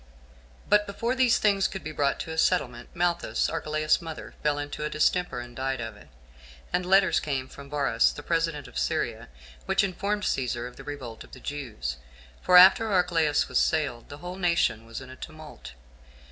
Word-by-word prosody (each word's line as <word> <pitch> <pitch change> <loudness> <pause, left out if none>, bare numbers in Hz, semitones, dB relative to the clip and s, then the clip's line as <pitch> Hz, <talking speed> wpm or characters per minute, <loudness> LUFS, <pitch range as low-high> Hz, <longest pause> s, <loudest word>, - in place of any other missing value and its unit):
1. - - -26 0.6
But 210 0 +4
before 230 +5 -2
these 255 -2 +4
things 200 -2 +3
could 190 - -7
be 155 - -5
brought 140 -2 0
to 160 - -6
a 160 - -5
settlement, 125 -11 +1
Malthace, 175 0 0
Archelaus's 155 +2 +1
mother, 160 -2 -8
fell 150 -1 +1
into 145 +1 -5
a 150 - -1
distemper, 175 -1 +1
and 120 0 -9
died 130 0 -2
of 115 -2 -5
it; 105 - -16 0.7
and 180 - 0
letters 190 +1 +4
came 135 -3 -3
from 140 +1 -12
Varus, 140 -6 +2
the 145 - -9
president 165 -4 -1
of - - -5
Syria, - - -2 0.4
which - - +3
informed 200 +2 -1
Cæsar 125 - -1
of 125 - -12
the - - -11
revolt 130 -6 -7
of - - -18
the - - -10
Jews; 110 - -5 0.4
for 180 0 +6
after 190 +4 +7
Archelaus 165 -5 +2
was - - +1
sailed, 120 -7 0
the 145 - -8
whole 180 +4 -7
nation 170 - +1
was 115 +3 -7
in 130 -1 -10
a - - -10
tumult. 155 - -10
150 Hz, 190 wpm, -27 LUFS, 130-180 Hz, 0.7 s, after